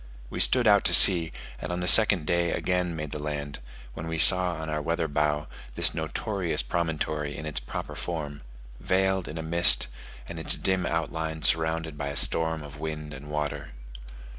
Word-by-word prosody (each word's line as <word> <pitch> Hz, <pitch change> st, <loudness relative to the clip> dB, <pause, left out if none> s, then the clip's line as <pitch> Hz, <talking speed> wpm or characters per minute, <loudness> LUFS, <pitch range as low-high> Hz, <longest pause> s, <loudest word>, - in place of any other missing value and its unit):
We -, -, -6 dB
stood 125 Hz, -1 st, +3 dB
out 100 Hz, -2 st, +4 dB
to -, -, +6 dB
sea, 85 Hz, -4 st, +8 dB, 0.3 s
and 80 Hz, -, -7 dB
on 90 Hz, -, -4 dB
the 90 Hz, -, -4 dB
second 100 Hz, -5 st, +3 dB
day 85 Hz, +1 st, -1 dB
again 90 Hz, -2 st, -2 dB
made 75 Hz, -2 st, -7 dB
the 75 Hz, -, -6 dB
land, 70 Hz, -1 st, -6 dB, 0.3 s
when 80 Hz, -, -8 dB
we 80 Hz, 0 st, -4 dB
saw 90 Hz, +1 st, +5 dB
on 80 Hz, 0 st, -7 dB
our 75 Hz, -1 st, -4 dB
weather 85 Hz, +1 st, -3 dB
bow 75 Hz, 0 st, -2 dB, 0.3 s
this -, -, +5 dB
notorious 85 Hz, -, -3 dB
promontory 75 Hz, -1 st, -4 dB
in 80 Hz, -, -8 dB
its 75 Hz, -4 st, -4 dB
proper -, -, -8 dB
form 75 Hz, -4 st, -7 dB, 0.4 s
veiled 95 Hz, 0 st, -1 dB
in 80 Hz, -, -8 dB
a 80 Hz, -, -6 dB
mist, 85 Hz, +2 st, +5 dB, 0.4 s
and 85 Hz, -1 st, -8 dB
its 80 Hz, -, +3 dB
dim 95 Hz, -2 st, -2 dB
outline 80 Hz, -1 st, -4 dB
surrounded 80 Hz, -1 st, 0 dB
by 70 Hz, -, -4 dB
a 70 Hz, -, -6 dB
storm 80 Hz, +1 st, 0 dB
of 75 Hz, 0 st, -12 dB
wind 75 Hz, -1 st, -7 dB
and 70 Hz, +2 st, -11 dB
water. 75 Hz, -3 st, -5 dB
80 Hz, 185 wpm, -25 LUFS, 75-85 Hz, 0.4 s, sea